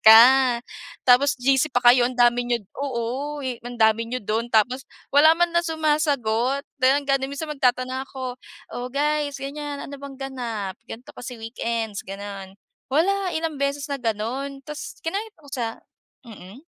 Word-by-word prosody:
ka 220 +1 +10 0.8
tapos 265 +3 +5
GC 270 +3 +2
pa 245 - +2
kayo 245 -1 +5
ang 250 - -4
dami 240 0 +3
niyo 240 -3 0 0.2
oo 275 +2 -3
ang 245 -1 -5
dami 220 0 +3
niyo 250 -1 -4
dun 220 +3 -1
tapos 245 +4 +2 0.2
wala 310 +3 +7
manlang 340 0 +1
sumasagot 280 -5 +1 0.2
dahil 270 +2 +4
nga 275 -1 +2
din 265 - -3
minsan 300 +2 -5
magtatanong 260 -1 0
ako, 255 -2 -6 0.4
"O 245 - -4
guys 290 -1 0
ganyan, 290 0 -5
ano 280 - -7
bang 280 0 -9
ganap? 230 -8 -4
Ganto 240 +3 -9
kasi 250 0 -8
weekends" 225 -3 -3
Ganun 195 -1 -7 0.4
wala 375 +4 +2
ilang 320 -2 -2
beses 280 +1 -1
na 280 - 0
ganon 250 +4 -3
tapos 300 0 -8
kinaya 395 +7 -2 0.2
ko 290 - -17
sa 230 -3 -3 0.4
mm. 225 - -12
260 Hz, 155 wpm, -24 LUFS, 235-285 Hz, 0.8 s, ka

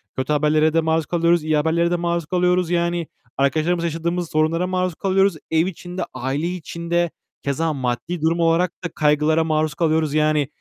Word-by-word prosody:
kötü 130 +3 -1
haberlere 155 +1 +2
de 165 - +3
maruz 160 0 0
kalıyoruz, 170 -1 +2
iyi 155 0 +1
haberlere 165 +3 +1
de - - +2
maruz 170 -1 -1
kalıyoruz. 180 0 +1
Yani 170 -1 0 0.3
arkadaşlarımızla 160 +5 +1
yaşadığımız 170 +1 -2
sorunlara 160 +3 +1
maruz 185 -2 -1
kalıyoruz. 195 0 +2 0.2
Ev 160 +1 +3
içinde, 180 0 -5
aile 135 +6 -2
içinde 170 -1 -2 0.3
keza 155 +3 -1
maddi 135 +6 -3
durum 165 +2 +1
olarak 165 +1 +2
da 175 - -2
kaygılara 155 +2 +2
maruz 155 -1 0
kalıyoruz 160 -3 +1
yani. 150 -2 +2
165 Hz, 165 wpm, -21 LUFS, 155-175 Hz, 0.3 s, de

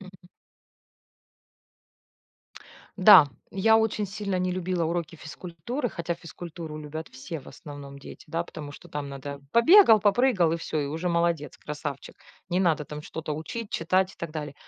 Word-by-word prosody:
Мгм. 190 -1 -13 2.8
Да. 190 -6 +9 0.2
Я 220 +3 +4
очень 220 -1 0
сильно 200 -1 -3
не 180 0 0
любила 180 -1 -1
уроки 165 0 -3
физкультуры, 175 - -5
хотя 170 -4 -3
физкультуру 165 -2 -8
любят 155 +2 -7
все, 140 +4 -7
в - - -19
основном 145 -2 -10
дети, 140 - -12
да, 165 +2 -1
потому 150 -4 -9
что 175 - -13
там 145 -1 -4
надо: 140 +1 -7
побегал, 235 - +7
попрыгал, 205 -5 +3
и 165 - +1
всё. 160 -1 -3
И 145 - -2
уже 160 +5 -3
молодец, 170 -4 0
красавчик. 145 -2 -6 0.4
Не 180 +2 +2
надо 160 -5 +2
там 150 +1 -7
что-то 155 0 -6
учить, 200 +9 -5
читать 185 +3 +1
и - - -20
так 170 -2 -5
далее. 150 -2 -5
170 Hz, 155 wpm, -26 LUFS, 150-190 Hz, 2.8 s, Да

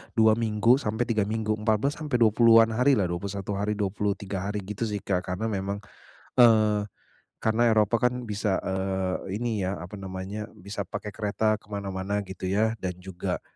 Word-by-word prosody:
2 110 0 +5
minggu 115 +3 +3
sampai 110 0 -1
3 110 -4 0
minggu, 110 0 -1
14 110 +6 +1
sampai 150 -5 -2
20-an 115 0 +6
hari 125 +4 +4
lah, 95 -5 0
21 100 +2 -4
hari, 105 +1 0
23 100 -1 -2
hari 105 -1 -3
gitu 105 +4 -3
sih 105 -1 -4
Kak. 90 -2 -1
Karena 110 +5 -2
memang, 100 +1 -3 0.6
eee, 110 -3 +5 0.5
karena 110 +2 +3
Eropa 110 +2 +3
kan 125 0 -2
bisa, 105 -3 -1
eee, 95 0 -2
ini 110 -4 -1
ya 95 - -1
apa 90 +4 -8
namanya, 95 +2 -5
bisa 100 -1 -6
pakai 105 +2 -5
kereta 110 +1 0
ke - - -26
mana-mana 100 0 -3
gitu 95 -1 -7
ya, 110 +4 +1
dan 95 -2 -3
juga 95 -2 -4
105 Hz, 170 wpm, -27 LUFS, 95-110 Hz, 0.6 s, 20-an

